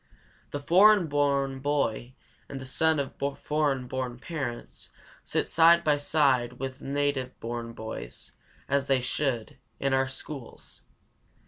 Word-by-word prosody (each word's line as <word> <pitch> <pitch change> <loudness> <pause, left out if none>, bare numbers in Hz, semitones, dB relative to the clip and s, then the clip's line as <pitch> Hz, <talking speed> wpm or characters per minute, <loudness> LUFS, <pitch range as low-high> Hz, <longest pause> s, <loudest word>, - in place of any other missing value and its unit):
The 145 - -4
foreign 190 +5 +6
born 140 -2 +1
boy 130 -3 -1 0.3
and 135 - -6
the 130 - -8
son 160 +4 +2
of 140 -2 -3 0.3
foreign 145 -4 0
born 125 -1 -4
parents 130 -4 -6 0.3
sit - - -1
side 170 +1 +6
by 150 -2 +3
side 140 -5 +2
with 130 +1 -6
native 140 -2 -2
born 115 0 -5
boys 110 - -8 0.4
(as 140 -1 +1
they 135 -1 +3
should) 125 -2 -2 0.2
in 135 -1 0
our 135 0 +2
schools. 130 -1 -8
135 Hz, 130 wpm, -28 LUFS, 125-145 Hz, 0.4 s, foreign